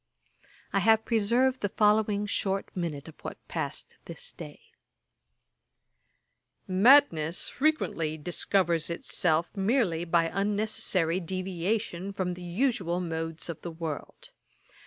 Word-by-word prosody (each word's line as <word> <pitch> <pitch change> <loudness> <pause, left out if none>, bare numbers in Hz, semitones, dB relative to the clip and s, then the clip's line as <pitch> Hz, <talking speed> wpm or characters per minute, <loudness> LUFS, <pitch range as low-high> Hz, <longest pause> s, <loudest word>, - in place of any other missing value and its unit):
I 195 - +3
have 220 +2 +4
preserved 240 +4 +2
the 205 - 0
following 210 0 +2
short 195 -1 -2
minute 160 -5 -3
of 160 - -10
what - - -6
passed - - -5
this - - -5
day: - - -10 2.1
'Madness 185 - +4
frequently 250 - 0
discovers 170 +1 0
itself 170 +1 0
merely 195 -5 +1
by 165 -1 +2
unnecessary 195 -4 0
deviation 185 +2 -2
from 185 -2 -2
the 180 - -9
usual 180 -1 0
modes 165 -2 -3
of 165 -2 -6
the 175 - -5
world. 160 -3 -6
185 Hz, 110 wpm, -28 LUFS, 165-210 Hz, 2.1 s, have